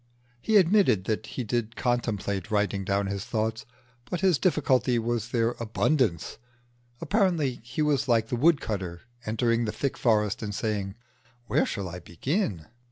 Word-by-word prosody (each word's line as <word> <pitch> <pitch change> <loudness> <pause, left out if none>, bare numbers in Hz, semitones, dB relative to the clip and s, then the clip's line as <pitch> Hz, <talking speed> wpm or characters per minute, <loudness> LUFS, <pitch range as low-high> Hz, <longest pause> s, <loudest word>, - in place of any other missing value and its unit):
He 220 -1 +4
admitted 180 - +4
that 110 +2 -2
he 125 - -4
did 115 0 -2
contemplate 105 -6 -1
writing 105 -2 0
down 100 +1 0
his 100 0 -3
thoughts, 110 +3 -2 0.4
but 180 - -2
his 185 -6 +3
difficulty 130 -7 +2
was 115 0 -1
their 115 -1 +1
abundance. 115 - 0 0.6
Apparently 175 - +1
he 125 +6 -2
was 145 -3 +1
like 115 -2 +2
the - - 0
woodcutter 105 - +1 0.3
entering 115 +1 +1
the 105 - -1
thick 140 +4 -3
forest 105 -2 +2
and 105 -2 -4
saying, 100 -3 -2 0.5
"Where - - +1
shall 100 -3 -3
I 90 0 -7
begin?" 90 - -2
115 Hz, 150 wpm, -27 LUFS, 105-135 Hz, 0.6 s, He